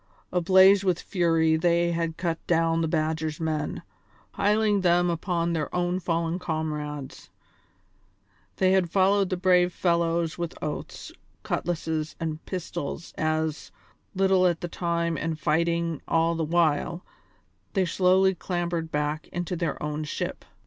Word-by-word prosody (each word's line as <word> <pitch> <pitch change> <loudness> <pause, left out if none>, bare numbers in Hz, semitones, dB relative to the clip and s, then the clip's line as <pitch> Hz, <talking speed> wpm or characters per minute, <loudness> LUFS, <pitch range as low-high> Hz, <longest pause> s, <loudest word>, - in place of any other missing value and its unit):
Ablaze 190 +2 +6
with 185 -3 +1
fury 165 -4 +2
they 170 +1 +2
had 165 -1 -2
cut 170 -2 -2
down 165 -1 +2
the 165 - +1
Badger's 155 -1 -1
men, 155 -2 -2 0.5
piling 210 0 +2
them 175 -1 +3
upon 170 0 -1
their 155 -3 -2
own 180 +1 0
fallen 170 -1 -1
comrades; 150 -5 -4 1.3
they 185 -1 +3
had 190 -3 +2
followed 195 +1 +3
the 185 - -1
brave 180 -1 +3
fellows 170 -1 0
with 170 -1 -4
oaths, 150 - -6 0.3
cutlasses, 160 -2 -2
and 160 -1 -4
pistols 170 -3 -5
as, 155 -1 -1 0.4
little 190 -1 +4
at 175 0 -1
a - - -1
time 170 -1 -1
and 165 -1 -3
fighting 170 +1 0
all 165 0 +2
the 165 -1 -2
while, 170 +1 +1 0.7
they 190 -2 +2
slowly 185 +2 +3
clambered 175 -3 -3
back 150 +1 -2
into 175 +1 -4
their 170 -1 -2
own 150 0 -3
ship. 150 - -4
170 Hz, 135 wpm, -26 LUFS, 160-180 Hz, 1.3 s, Ablaze